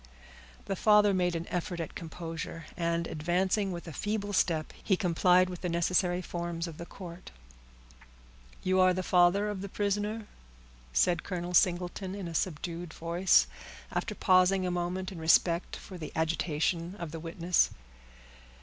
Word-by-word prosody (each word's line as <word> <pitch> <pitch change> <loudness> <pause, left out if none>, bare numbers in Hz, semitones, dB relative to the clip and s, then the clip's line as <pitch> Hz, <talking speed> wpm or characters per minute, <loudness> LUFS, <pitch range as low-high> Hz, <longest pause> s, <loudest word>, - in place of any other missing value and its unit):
The 195 - -2
father 210 +1 +5
made 180 -2 +1
an 165 +1 -4
effort 180 0 -3
at 165 - -4
composure, 165 0 -6
and, 170 -1 0
advancing 185 +6 0
with 170 -1 -6
a 165 - -7
feeble 205 +3 -2
step, 160 -5 +1
he 190 - +2
complied 180 0 +4
with 180 -1 -7
the 180 - -2
necessary 175 +1 +1
forms 170 -1 -4
of 160 -2 -9
the 170 - -7
court. 175 -2 -10 1.3
"You 185 0 +2
are 185 -1 +5
the 185 - -2
father 180 +3 +4
of 205 -2 -3
the 200 - -5
prisoner?" 205 +2 -1 0.7
said 165 - +2
Colonel 180 -2 -4
Singleton, 180 +1 +1
in 195 -3 -5
a 170 - -6
subdued 170 0 -3
voice, 170 - +3 0.5
after - - -2
pausing 185 +1 +4
a 180 - 0
moment 180 +2 -2
in 180 - -8
respect 170 +2 +3
for 185 -2 -10
the 155 - -6
agitation 165 +2 0
of 170 -5 -6
the 165 - -6
witness. 170 +2 +1
175 Hz, 155 wpm, -30 LUFS, 170-185 Hz, 1.3 s, father